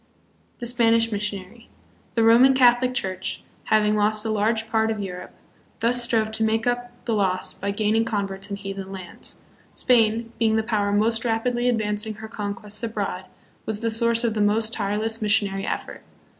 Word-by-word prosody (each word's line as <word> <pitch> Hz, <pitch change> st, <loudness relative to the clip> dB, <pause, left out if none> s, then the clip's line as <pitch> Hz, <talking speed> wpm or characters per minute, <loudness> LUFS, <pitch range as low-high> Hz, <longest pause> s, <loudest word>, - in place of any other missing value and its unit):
The 240 Hz, -, -6 dB
Spanish 230 Hz, -1 st, +2 dB
Missionary. 205 Hz, +2 st, -5 dB, 0.5 s
The 230 Hz, -, +3 dB
Roman 240 Hz, +4 st, +6 dB
Catholic 250 Hz, 0 st, +4 dB
Church, 185 Hz, -4 st, -3 dB, 0.2 s
having 215 Hz, -1 st, +3 dB
lost 210 Hz, +1 st, +1 dB
a 220 Hz, -, 0 dB
large 220 Hz, +1 st, 0 dB
part 220 Hz, 0 st, +1 dB
of 220 Hz, -1 st, -2 dB
Europe, 180 Hz, -3 st, -6 dB, 0.5 s
thus 240 Hz, +2 st, +2 dB
strove 225 Hz, -2 st, +1 dB
to 220 Hz, 0 st, -1 dB
make 220 Hz, +1 st, +1 dB
up 245 Hz, 0 st, -3 dB
the 230 Hz, -, 0 dB
loss 190 Hz, -3 st, 0 dB
by 200 Hz, -, -4 dB
gaining 215 Hz, +2 st, +1 dB
converts 200 Hz, -3 st, -3 dB
in 200 Hz, -, -3 dB
heathen 195 Hz, -1 st, -7 dB
lands. 185 Hz, -3 st, -8 dB, 0.3 s
Spain, 230 Hz, -2 st, +2 dB
being 220 Hz, -1 st, +3 dB
the 220 Hz, -, +1 dB
power 210 Hz, -3 st, 0 dB
most 225 Hz, +2 st, +2 dB
rapidly 240 Hz, +1 st, 0 dB
advancing 215 Hz, -2 st, -1 dB
her 220 Hz, +1 st, -9 dB
conquests 210 Hz, 0 st, -3 dB
abroad, 200 Hz, -5 st, -3 dB, 0.4 s
was 220 Hz, -1 st, -1 dB
the 230 Hz, -1 st, 0 dB
source 230 Hz, +1 st, +2 dB
of 230 Hz, -2 st, +1 dB
the 215 Hz, -, -1 dB
most 215 Hz, +2 st, +2 dB
tireless 220 Hz, +2 st, -1 dB
missionary 200 Hz, -2 st, +1 dB
effort. -, -, -4 dB
220 Hz, 170 wpm, -24 LUFS, 205-230 Hz, 0.5 s, Roman